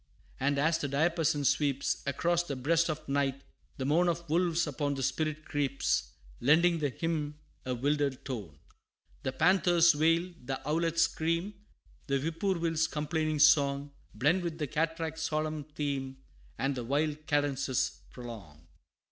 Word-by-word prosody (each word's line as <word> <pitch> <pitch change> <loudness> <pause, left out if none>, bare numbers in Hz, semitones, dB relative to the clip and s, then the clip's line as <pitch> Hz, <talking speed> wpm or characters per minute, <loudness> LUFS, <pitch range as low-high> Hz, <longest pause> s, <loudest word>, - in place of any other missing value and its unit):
And 140 +2 +1
as 160 +3 +2
the 145 - -2
diapason 150 0 +1
sweeps 140 0 +1
Across 170 +5 +1
the 140 - -4
breast 165 +6 +2
of 155 0 -4
night, 140 -1 0 0.3
the 130 - -3
moan 170 +5 +3
Of 170 0 -3
wolves 170 0 +2
upon 145 -1 -2
the 135 - -3
spirit 155 +2 -1
creeps, 140 -2 -1 0.3
Lending 165 +5 +4
the 145 -2 0
hymn 150 0 -3 0.3
a 125 - 0
wilder 145 +3 +1
tone. 115 - -7 0.6
The 130 - -2
panther's 170 +2 +4
wail, 165 +4 +2
the 135 +1 -3
owlet's 165 +2 +2
scream, 165 +5 -1 0.5
The 140 -1 +1
whippoorwill's 165 +1 0
complaining 155 +1 -1
song, 145 -1 +4 0.2
Blend 150 - +2
with 170 -2 -4
the 155 - -1
cataract's 160 +2 -2
solemn 155 -1 -2
theme, 140 -3 -4 0.4
And 135 +1 0
the 125 -2 -4
wild 150 +4 -1
cadences 140 -3 0
prolong. 100 - -10
150 Hz, 140 wpm, -30 LUFS, 140-165 Hz, 0.6 s, Lending